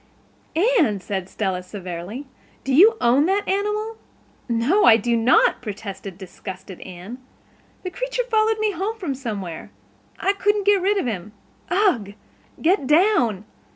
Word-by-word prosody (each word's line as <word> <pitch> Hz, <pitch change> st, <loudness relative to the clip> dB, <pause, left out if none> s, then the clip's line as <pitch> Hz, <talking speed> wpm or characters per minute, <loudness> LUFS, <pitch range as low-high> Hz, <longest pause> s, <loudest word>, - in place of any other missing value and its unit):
"Anne," 215 Hz, -, +2 dB
said 190 Hz, 0 st, -4 dB
Stella 190 Hz, -3 st, -2 dB
severely, 185 Hz, +6 st, -7 dB, 0.4 s
"do 270 Hz, -, -1 dB
you 425 Hz, -, +7 dB
own 260 Hz, +6 st, +3 dB
that 400 Hz, +2 st, 0 dB
animal?" 420 Hz, +3 st, -1 dB, 0.5 s
"No, 240 Hz, -, +2 dB
I 225 Hz, -1 st, +8 dB
do 235 Hz, +2 st, 0 dB
not," 230 Hz, +2 st, +3 dB
protested 200 Hz, -4 st, -7 dB
disgusted 190 Hz, 0 st, -9 dB
Anne. 190 Hz, +7 st, -9 dB, 0.6 s
"The 365 Hz, -, -4 dB
creature -, -, -2 dB
followed 440 Hz, -2 st, +2 dB
me 430 Hz, -1 st, +1 dB
home 400 Hz, +5 st, -3 dB
from 350 Hz, -10 st, -3 dB
somewhere. 205 Hz, -11 st, -6 dB, 0.5 s
I 390 Hz, -, +2 dB
couldn't 410 Hz, 0 st, +1 dB
get 405 Hz, -2 st, +4 dB
rid 400 Hz, +3 st, +2 dB
of 385 Hz, -, 0 dB
him. 210 Hz, -3 st, -4 dB, 0.4 s
Ugh, 345 Hz, -, +1 dB, 0.4 s
get 340 Hz, -4 st, +2 dB
down. 280 Hz, -, +3 dB
260 Hz, 140 wpm, -22 LUFS, -, 0.6 s, I